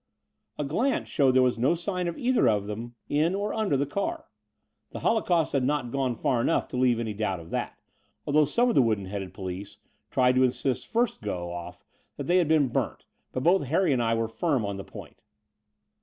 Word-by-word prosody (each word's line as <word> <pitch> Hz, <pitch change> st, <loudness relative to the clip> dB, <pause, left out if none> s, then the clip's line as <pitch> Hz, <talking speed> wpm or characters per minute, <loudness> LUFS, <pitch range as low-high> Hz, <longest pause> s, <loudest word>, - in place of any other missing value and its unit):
A 150 Hz, -, -1 dB
glance 225 Hz, -, 0 dB
showed 140 Hz, -, +2 dB
that 130 Hz, -, +4 dB
there 130 Hz, -, +5 dB
was 125 Hz, -2 st, +1 dB
no 135 Hz, +8 st, +3 dB
sign 180 Hz, +1 st, -2 dB
of 170 Hz, -, -4 dB
either 255 Hz, +1 st, +3 dB
of 105 Hz, -2 st, +1 dB
them 115 Hz, +3 st, -6 dB
in 155 Hz, +5 st, +1 dB
or 205 Hz, +1 st, -2 dB
under 215 Hz, -10 st, +1 dB
the 140 Hz, -, +1 dB
car. 310 Hz, -, -3 dB, 0.6 s
The -, -, -8 dB
holocaust 180 Hz, -7 st, +1 dB
had 135 Hz, -2 st, +2 dB
not 130 Hz, -3 st, 0 dB
gone 130 Hz, -2 st, 0 dB
far 120 Hz, +1 st, 0 dB
enough -, -, +1 dB
to -, -, -6 dB
leave 125 Hz, -2 st, +3 dB
any 110 Hz, -2 st, -3 dB
doubt 100 Hz, -3 st, -2 dB
of 85 Hz, 0 st, -12 dB
that, -, -, -3 dB, 0.5 s
although 150 Hz, +1 st, +4 dB
some 235 Hz, -, +2 dB
of 240 Hz, -, +2 dB
the -, -, +5 dB
wooden 110 Hz, -5 st, +1 dB
headed 95 Hz, -1 st, -5 dB
police 95 Hz, +1 st, -7 dB, 0.3 s
tried 125 Hz, 0 st, +3 dB
to 130 Hz, 0 st, +4 dB
insist 130 Hz, 0 st, 0 dB
first 235 Hz, 0 st, 0 dB
go 90 Hz, -5 st, -4 dB
ofif 85 Hz, -1 st, -8 dB, 0.3 s
that -, -, -3 dB
they 175 Hz, +2 st, +2 dB
had 175 Hz, -3 st, +3 dB
been 150 Hz, -4 st, +3 dB
burnt: -, -, -2 dB, 0.3 s
but 130 Hz, -, -3 dB
both 175 Hz, 0 st, +4 dB
Harry 165 Hz, +2 st, +2 dB
and 125 Hz, -, +1 dB
I 115 Hz, 0 st, +1 dB
were 115 Hz, 0 st, 0 dB
firm 130 Hz, 0 st, 0 dB
on 100 Hz, -1 st, -3 dB
the 100 Hz, -, -6 dB
point. -, -, -12 dB
130 Hz, 215 wpm, -27 LUFS, 115-170 Hz, 0.6 s, there